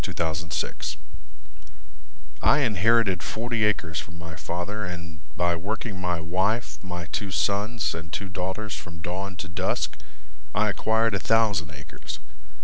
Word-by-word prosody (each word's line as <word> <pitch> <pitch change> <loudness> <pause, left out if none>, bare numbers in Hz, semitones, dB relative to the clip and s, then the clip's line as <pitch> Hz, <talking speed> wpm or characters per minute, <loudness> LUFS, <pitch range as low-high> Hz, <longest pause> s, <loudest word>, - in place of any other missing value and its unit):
Cooney - - -3
Potter 80 -1 0 1.7
I - - +6
inherited 110 - +4
forty 115 +2 -1
acres 90 -6 +1
from 85 0 -7
my 80 -1 -7
Father 90 +7 -2
And, 85 -3 -5 0.2
by 85 -1 +3
working 100 +2 -3
my 90 -2 +1
wife, 95 +8 +1
my 90 -2 -4
two 100 +5 -2
sons 100 +3 +1
and 80 -1 -6
two 100 +4 -2
daughters 95 +3 -2
From 85 -2 -7
dawn 95 +3 -2
to 85 - -5
dusk, 85 - 0 0.6
I 105 +2 +4
acquired 110 +3 +3
A 100 - +2
thousand 105 -7 +3
acres. 70 +1 -7
95 Hz, 140 wpm, -27 LUFS, 85-105 Hz, 1.7 s, I